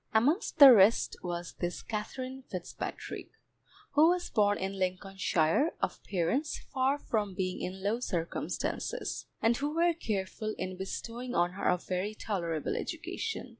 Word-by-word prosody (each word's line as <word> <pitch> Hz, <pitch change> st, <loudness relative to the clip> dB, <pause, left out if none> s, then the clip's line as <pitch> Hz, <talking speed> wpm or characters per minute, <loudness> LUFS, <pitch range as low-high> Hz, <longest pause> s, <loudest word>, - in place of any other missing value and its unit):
Amongst 290 Hz, -, +2 dB
the 280 Hz, -4 st, +12 dB
rest 210 Hz, +1 st, +5 dB
was 175 Hz, -1 st, -4 dB
this 175 Hz, 0 st, -3 dB
Katherine 255 Hz, +5 st, -5 dB
Fitzpatrick, 180 Hz, -2 st, -6 dB, 0.6 s
who 310 Hz, +3 st, +6 dB
was 355 Hz, 0 st, 0 dB
born 205 Hz, -2 st, +3 dB
in 195 Hz, +1 st, -3 dB
Lincolnshire, 185 Hz, -, +1 dB
of -, -, -2 dB
parents 210 Hz, -, 0 dB
far 265 Hz, +1 st, 0 dB
from 210 Hz, -8 st, -2 dB
being 185 Hz, -1 st, -2 dB
in 190 Hz, +1 st, -5 dB
low 215 Hz, +4 st, +1 dB
circumstances, 170 Hz, -9 st, -3 dB, 0.2 s
and 230 Hz, +1 st, +4 dB
who 290 Hz, +2 st, -2 dB
were 340 Hz, +1 st, +4 dB
careful 215 Hz, -, -3 dB
in 185 Hz, 0 st, -4 dB
bestowing 235 Hz, +6 st, -5 dB
on 175 Hz, +1 st, +3 dB
her 190 Hz, -, -3 dB
a -, -, +4 dB
very 185 Hz, +4 st, -3 dB
tolerable 170 Hz, -8 st, -2 dB
education. 450 Hz, -, -4 dB
205 Hz, 140 wpm, -31 LUFS, 185-260 Hz, 0.6 s, the